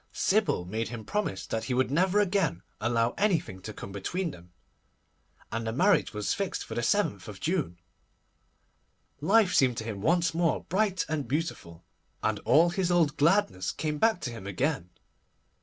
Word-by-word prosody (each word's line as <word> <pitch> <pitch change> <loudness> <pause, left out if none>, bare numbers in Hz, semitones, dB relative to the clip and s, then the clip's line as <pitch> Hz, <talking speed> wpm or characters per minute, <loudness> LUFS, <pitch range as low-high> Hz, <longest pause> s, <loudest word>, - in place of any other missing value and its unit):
Sybil 200 - +1
made 110 +5 -3
him 115 -3 -7
promise 110 - -2
that 110 0 -3
he 125 - -1
would 130 0 +1
never 185 +6 +3
again 195 - +1 0.2
allow 115 +1 +1
anything 175 - 0
to 110 - -7
come 100 - -8
between 165 - -3
them, 90 -4 -14 1.0
and 115 0 -3
the - - 0
marriage 175 - +3
was 105 -1 -1
fixed 195 -2 -3
for - - -7
the 120 - -1
7th 105 - 0
June. 155 - -1 1.4
Life 195 +4 +4
seemed 125 -3 +3
to - - -3
him 110 -3 -5
once 170 - +2
more 165 -1 +1
bright 190 -1 0
and 150 -5 -2
beautiful, 125 - -4 0.4
and - - 0
all 170 +3 +5
his 185 -1 0
old 170 -4 +3
gladness 165 - +2
came 150 -1 -3
back 225 -2 +3
to 120 - -3
him 110 -4 -8
again. 115 - -1
145 Hz, 165 wpm, -28 LUFS, 110-180 Hz, 1.4 s, all